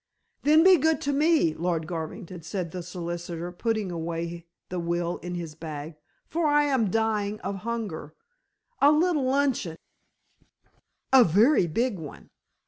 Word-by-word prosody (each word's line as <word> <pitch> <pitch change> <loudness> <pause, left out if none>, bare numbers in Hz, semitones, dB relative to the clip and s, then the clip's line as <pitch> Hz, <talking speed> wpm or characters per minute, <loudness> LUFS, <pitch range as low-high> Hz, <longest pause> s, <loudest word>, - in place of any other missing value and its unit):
"Then 310 +3 +5
be 375 0 +7
good 320 +2 +2
to 285 - -1
me, 300 - +3
Lord 165 -1 -1
Garvington," 175 +2 -6
said 170 0 -4
the 180 - -5
solicitor, 175 0 -5
putting 215 +1 -2
away 170 0 -4 0.2
the 180 - -3
will 170 0 -1
in 180 0 -6
his 170 -3 -5
bag, 155 0 -7 0.3
"for 330 -1 0
I 295 0 +4
am 265 -8 +1
dying 215 -1 0
of 195 +1 -3
hunger. 200 -8 -5 0.7
A 285 - +7
little 305 -2 +2
luncheon 260 - 0 0.7
" - - -49 0.5
"A 260 -2 +9
very 210 - +4
big 230 +4 -1
one." 150 -3 -10
185 Hz, 145 wpm, -26 LUFS, 170-260 Hz, 0.7 s, A